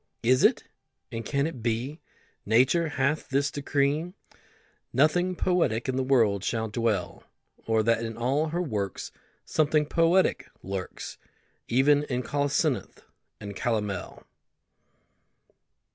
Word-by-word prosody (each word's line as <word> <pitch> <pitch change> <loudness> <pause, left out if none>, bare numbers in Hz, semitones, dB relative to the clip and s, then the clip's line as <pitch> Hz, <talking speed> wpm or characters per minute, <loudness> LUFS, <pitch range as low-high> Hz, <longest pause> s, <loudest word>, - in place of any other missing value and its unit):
Is 130 +3 +4
it, - - +4 0.5
and 115 0 -4
can 140 +5 0
it 145 -7 -5
be, 120 +7 -2 0.4
Nature 130 +10 +3
hath 145 +1 -1
this 140 +1 +1
decree, 145 +4 0 0.8
Nothing 175 +7 +2
poetic 170 -12 +1
in 130 - -1
the 130 - +1
world 115 -7 +2
shall 110 +1 -1
dwell? 105 -4 -1 0.4
Or 110 -1 +2
that 115 +1 +2
in 115 -1 -5
all 135 +6 +1
her 170 +3 -1
works 105 - -3 0.3
Something 155 0 +2
poetic 165 +5 +2
lurks, 95 -1 -6 0.5
Even 140 +4 +4
in 125 -2 -2
colocynth 145 +1 -1 0.4
and 100 -1 -7
calomel? 105 -4 -3
130 Hz, 115 wpm, -27 LUFS, 115-150 Hz, 0.8 s, Is